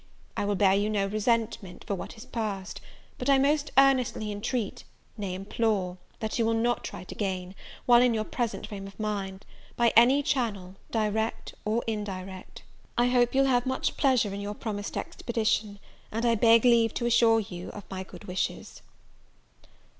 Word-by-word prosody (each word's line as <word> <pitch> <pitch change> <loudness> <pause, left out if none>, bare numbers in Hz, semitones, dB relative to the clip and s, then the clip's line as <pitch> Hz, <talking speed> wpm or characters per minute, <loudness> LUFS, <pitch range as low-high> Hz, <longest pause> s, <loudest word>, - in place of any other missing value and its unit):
I - - -1
will 205 0 0
bear 195 -1 +4
you 205 +2 +1
no 205 -2 +1
resentment 215 -2 -1
for - - -1
what 195 +4 -6
is 220 - -10
past; 205 -5 -4 0.4
but 250 - -2
I 275 - +6
most 285 +2 +2
earnestly 255 -6 +3
intreat, 210 +1 -3 0.3
nay 200 -4 -4
implore, 195 -2 -1 0.2
that 220 +2 -2
you 230 - +3
will 225 - +2
not 240 +2 0
write 180 - -9
again, 185 -3 -3 0.3
while 240 -1 +7
in 245 -2 +3
your 215 - 0
present 235 +1 -3
frame 195 -2 -7
of 195 0 -14
mind, 200 -2 -3 0.3
by 235 -1 +3
any 255 +5 +6
channel, 220 -10 -1 0.2
direct 220 0 -1
or 220 +3 0
indirect. 195 -4 -5 0.3
"I 240 +1 +4
hope 245 0 +2
you 270 - +5
will 270 - +2
have 245 0 +2
much 260 - -1
pleasure 250 -7 +2
in 200 - -4
your 205 +1 -4
promised 205 -2 -4
expedition; 220 -3 -1 0.3
and 225 +2 -1
I 235 - +4
beg 230 +1 +5
leave 230 -2 +4
to 240 - -1
assure 235 -1 +5
you 180 -4 -6
of 205 - -8
my 190 -1 -4
good 190 - -11
wishes." 185 0 -4
220 Hz, 175 wpm, -28 LUFS, 200-240 Hz, 0.4 s, while